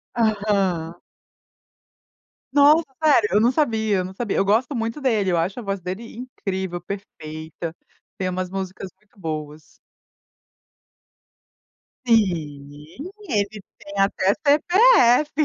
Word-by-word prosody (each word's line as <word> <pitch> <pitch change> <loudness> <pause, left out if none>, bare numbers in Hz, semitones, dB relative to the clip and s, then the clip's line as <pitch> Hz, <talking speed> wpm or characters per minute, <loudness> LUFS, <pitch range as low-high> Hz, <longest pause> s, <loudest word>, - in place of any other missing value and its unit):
Aham. 200 -7 0 1.6
Nossa, 295 +3 +5 0.2
sério, 255 -9 +4
eu 210 - +4
não 235 +2 +4
sabia, 220 -7 +1
eu 185 - -1
não 190 - -8
sabia, 220 0 -2
eu - - +2
gosto 225 +7 +2
muito 230 +4 -3
dele, 215 -8 +1
eu 175 - +2
acho 180 +7 -1
a 240 - -7
voz 195 -1 -3
dele 190 +6 -6
incrível, 190 -7 -4
perfeita, 160 -3 -7 0.4
tem 185 -1 -1
umas 185 0 -3
músicas 190 0 -5
muito 215 -1 -29
boas. 155 -2 -5 2.4
Sim, 160 - -1 0.2
ele 205 -4 -2 0.2
tem 200 - -11
até 195 0 +2
CPF. 305 - +4
200 Hz, 115 wpm, -22 LUFS, 180-235 Hz, 2.4 s, Nossa